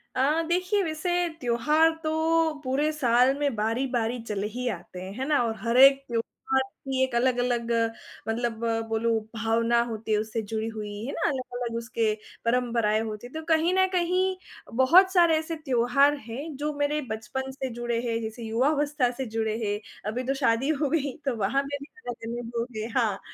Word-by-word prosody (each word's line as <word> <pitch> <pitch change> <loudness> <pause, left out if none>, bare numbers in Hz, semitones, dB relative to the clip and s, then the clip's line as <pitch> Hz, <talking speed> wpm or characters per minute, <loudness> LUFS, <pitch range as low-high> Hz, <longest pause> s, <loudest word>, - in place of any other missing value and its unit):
अ, 295 +5 +2
देखिए 365 +4 +1
वैसे 320 +1 -2 0.3
त्योहार 300 +7 +3
तो 320 0 +2
पूरे 280 +4 +1
साल 250 -2 +4
में 285 -5 0
बारी-बारी 235 +2 0
चले 210 -2 -3
ही 250 0 -2
आते 180 -2 -7
हैं, 185 - -6
है 265 - -1
ना 300 -3 +3
और 225 -1 -1
हर 230 +4 0
एक 275 +1 +8
त्योहार 240 +3 -1
की 265 0 -3
एक 260 -2 -1
अलग-अलग 245 -1 +1 0.6
मतलब 225 0 -1 0.3
बोलो 225 0 +1 0.2
भावना 230 +1 +2
होती 220 0 -5
है 210 - +4
उससे 220 +1 -3
जुड़ी 220 +1 -3
हुई, 215 -2 -5 0.2
है 275 - -3
ना - - -5
अलग-अलग 245 -3 -3
उसके 230 -2 0 0.3
परंपराएँ 230 -3 +2
होती 220 +1 -5
हैं, 245 - -18
तो 315 - -4
कहीं 325 +3 +2
न 375 0 +4
कहीं 365 +1 +1 0.5
बहुत 370 +8 +6
सारे 340 -3 +5
ऐसे 320 +1 -4
त्योहार 275 -1 +3
हैं 280 +7 -6
जो 300 +2 -2
मेरे 290 +1 +1
बचपन 265 +5 -4
से 265 0 -4
जुड़े 240 0 -2
हैं, 230 0 -1
जैसे 220 +2 -6
युवावस्था 280 +3 +1
से 265 +2 -4
जुड़े 220 -1 -2
हैं। 205 0 -1 0.3
अभी 250 +3 -3
तो 265 +2 0
शादी 235 +4 +2
हो 290 - +2
गई 280 -3 0
तो 270 -3 0
वहाँ 225 +7 +1
पे 285 +1 -4
भी - - -7 0.2
अगल-अलग 235 0 -5
लोग 235 -1 -3
हैं 215 +2 -3
हाँ, 215 -5 +1
245 Hz, 180 wpm, -27 LUFS, 230-290 Hz, 0.6 s, एक